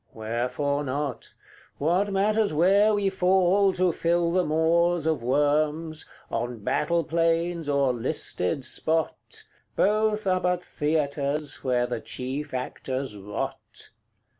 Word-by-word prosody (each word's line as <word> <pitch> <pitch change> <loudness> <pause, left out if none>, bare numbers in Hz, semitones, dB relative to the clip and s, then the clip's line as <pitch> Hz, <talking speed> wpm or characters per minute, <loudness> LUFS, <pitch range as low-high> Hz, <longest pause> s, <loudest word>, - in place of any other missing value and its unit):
Wherefore 125 +6 -2
not? 140 -1 -4 0.4
What 180 +7 +1
matters 205 0 +1
where 200 +7 +4
we 200 -1 +1
fall 190 +1 +3
to 185 -1 +2
fill 170 +1 +1
the 185 +1 +2
maws 165 +1 +2
Of 160 -5 0
worms 150 +4 0 0.2
on 120 -2 -3
battle 170 +8 +1
plains 165 0 0
or 140 -2 +2
listed 120 0 -1
spot? 160 +2 -2 0.3
Both 215 +1 +2
are 185 -1 +1
but 180 0 0
theatres 150 -1 -1
where 125 -2 +1
the 120 -2 -4
chief 130 +4 -5
actors 130 -1 -4
rot. 100 +1 -6
155 Hz, 115 wpm, -26 LUFS, 140-180 Hz, 0.4 s, where